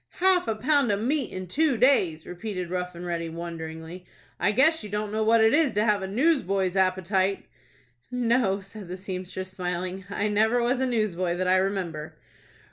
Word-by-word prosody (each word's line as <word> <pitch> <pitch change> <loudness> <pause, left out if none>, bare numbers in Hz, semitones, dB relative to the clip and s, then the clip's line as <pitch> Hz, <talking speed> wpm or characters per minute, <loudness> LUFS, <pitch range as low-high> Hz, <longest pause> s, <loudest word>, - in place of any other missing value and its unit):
"Half 370 -4 +3
a 225 - 0
pound 275 +1 +2
of 200 - 0
meat 265 +4 0
in 185 0 -5
two 280 - +1
days!" 185 - +3
repeated 180 -1 -5
Rough 180 -1 -3
and 175 +1 -7
Ready, 170 -1 -3
wonderingly. 165 +1 -7 0.4
"I 205 - +2
guess 315 +9 +3
you 210 - -7
don't 210 +1 -3
know 220 +1 0
what 225 +1 +4
it 220 - +4
is 300 -6 +3
to 210 - +3
have 210 -2 +2
a 190 - -3
newsboy's 195 - +1
appetite." 190 +1 +1 0.6
"No," 235 -5 +1
said 200 0 -10
the 180 +1 -6
seamstress, 185 0 -6
smiling. 180 +1 -4
"I 205 +1 -1
never 220 +3 +2
was 245 +2 +1
a 260 - +1
newsboy 185 -7 0
that 185 +1 -1
I 185 +1 +4
remember." 185 -5 -2
195 Hz, 185 wpm, -26 LUFS, 180-230 Hz, 0.6 s, what